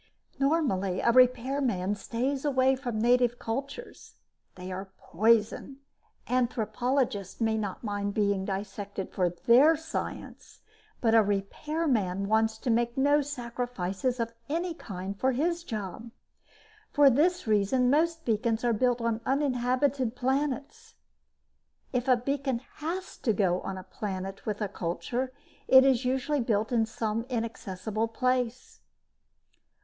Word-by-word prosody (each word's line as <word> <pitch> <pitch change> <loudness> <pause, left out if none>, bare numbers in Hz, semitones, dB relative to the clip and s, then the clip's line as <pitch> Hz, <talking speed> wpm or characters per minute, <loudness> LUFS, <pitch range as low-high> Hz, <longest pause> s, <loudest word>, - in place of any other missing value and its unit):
Normally, 265 - +1
a 235 - +3
repairman 250 -5 +2
stays 250 +7 -2
away 265 -2 +3
from 245 -4 -4
native 245 +1 +3
cultures. 275 - -6 0.4
They 185 0 -7
are 190 +1 -6
poison. 225 +4 +1 0.5
Anthropologists 240 -3 -1
may 220 -1 +1
not 205 -2 -4
mind 205 -2 -2
being 200 -2 +1
dissected 200 0 -5
for 180 -2 +1
their 250 - +5
science, 320 +1 -6 0.4
but 225 -2 +3
a 225 - +7
repairman 205 - -1
wants 220 +1 +2
to 240 - -1
make 235 +2 +1
no 285 +2 +4
sacrifices 245 -4 -3
of 230 0 -2 0.2
any 340 +3 -1
kind 195 - -7
for 260 0 +2
his 335 +6 0
job. 215 - -6 0.8
For 285 -2 +6
this 350 +7 +2
reason, 220 +4 +2
most 325 +2 +1
beacons 225 0 0
are 240 -1 +2
built 245 +2 +1
on 230 -1 -1
uninhabited 255 -2 0
planets. 285 - -2 1.0
If 250 +1 -1
a 255 -1 +5
beacon 265 -1 -2 0.2
has 345 +5 -4
to 225 - 0
go 185 -3 +1
on 190 - -5
a 185 - -7
planet 195 0 -6
with 210 0 -2
a 210 - 0
culture, 220 +8 -3 0.4
it 260 0 +8
is 260 -2 +3
usually 265 +3 0
built 220 -1 0
in 225 -2 +2
some 225 +1 -3
inaccessible 220 -2 -3
place. 250 +1 -2
235 Hz, 130 wpm, -28 LUFS, 210-265 Hz, 1.0 s, it